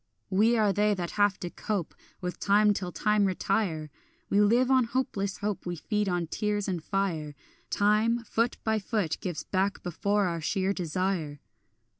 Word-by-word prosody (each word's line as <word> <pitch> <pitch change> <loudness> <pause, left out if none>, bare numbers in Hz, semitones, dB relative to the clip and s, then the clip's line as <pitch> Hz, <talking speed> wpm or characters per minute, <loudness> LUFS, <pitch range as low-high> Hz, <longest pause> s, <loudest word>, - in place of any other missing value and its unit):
We 220 +5 +4
are 210 -3 +3
they 210 +1 +2
that 175 -2 -4
have 205 -1 +2
to 175 - -4
cope 200 -7 -3 0.3
With 180 -1 -4
time 205 +1 +4
till 180 -3 -4
time 210 +5 +2
retire; 185 -5 -1 0.4
We 205 - +4
live 240 +5 +4
on 260 -2 +5
hopeless 230 -5 -2
hope, 205 -3 -3
We 175 - -2
feed 210 +5 -1
on 175 -1 0
tears 205 +4 -1
and 175 -4 -2
fire; 165 -7 -2 0.3
Time, 215 +3 +2
foot 230 +1 0
by 220 -1 +1
foot, 200 -5 -1
gives 175 -4 -4
back 195 +1 -1
before 200 +4 0
our 170 -2 -2
sheer 190 +4 0
desire. 175 -4 -2
200 Hz, 165 wpm, -28 LUFS, 180-210 Hz, 0.4 s, on